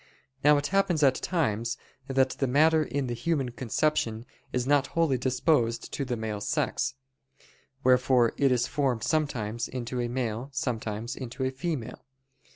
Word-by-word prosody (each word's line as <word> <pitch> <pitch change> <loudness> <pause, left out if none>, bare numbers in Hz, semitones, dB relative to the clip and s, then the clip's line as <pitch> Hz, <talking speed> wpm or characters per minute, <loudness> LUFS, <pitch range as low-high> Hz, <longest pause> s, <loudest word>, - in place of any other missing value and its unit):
Now 150 +1 +6
it 145 - -1
happens 190 -6 +2
at 135 -2 +6
times 120 - -1 0.3
that 135 -1 +2
the 135 - -1
matter 155 +5 +4
in 140 -2 -2
the 120 - -2
human 135 +2 -1
conception 120 -2 -1 0.3
is 125 -1 -1
not 140 0 +3
wholly 155 -6 +3
disposed 125 -2 +1
to 140 - -1
the 125 -2 -2
male 110 -2 -4
sex; 105 - -1 0.9
wherefore 125 -2 +4
it 140 -2 +3
is 120 -1 +2
formed 130 -5 0
sometimes 120 -7 -1
into 125 0 -4
a 120 - -1
male, 120 0 -3
sometimes 115 -3 -3
into 130 +1 -5
a 130 - 0
female. 135 -2 -4
130 Hz, 155 wpm, -28 LUFS, 120-145 Hz, 0.9 s, Now